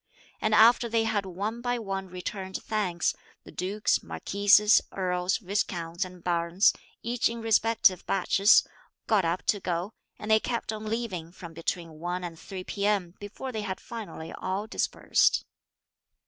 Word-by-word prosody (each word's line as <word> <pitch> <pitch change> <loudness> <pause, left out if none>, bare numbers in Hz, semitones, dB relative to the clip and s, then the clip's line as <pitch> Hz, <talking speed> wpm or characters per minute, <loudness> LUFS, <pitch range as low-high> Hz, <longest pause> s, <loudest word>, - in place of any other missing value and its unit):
And 215 0 +2
after 235 +2 +6
they 225 0 +2
had 210 -3 -1
one 205 +6 -4
by 245 0 0
one 195 -4 -4
returned 190 +1 -5
thanks, 185 -6 0 0.3
the - - -13
dukes, 200 +4 0
marquises, 205 +2 +4
earls, 180 0 0
viscounts 180 -4 -2
and 180 -2 -10
barons, 170 +2 +3 0.3
each 240 +2 +1
in 235 0 -5
respective 225 -3 +3
batches, 195 +2 +4 0.4
(got 210 -5 +2
up 170 +2 -1
to 205 - +2
go,) 180 +3 -3 0.2
and 215 - -4
they 220 - +6
kept 235 -1 -3
on 215 0 -6
leaving 215 -7 -3
from 170 -2 -10
between 165 -1 -4
1 175 +2 -3
and 165 -2 -6
3 190 -2 -7
p.m. 200 -3 -1
before 210 +6 -7
they 220 -3 -3
had 190 -2 -4
finally 215 -8 -8
all 190 +3 -3
dispersed. 220 - +1
195 Hz, 150 wpm, -28 LUFS, 180-220 Hz, 0.4 s, after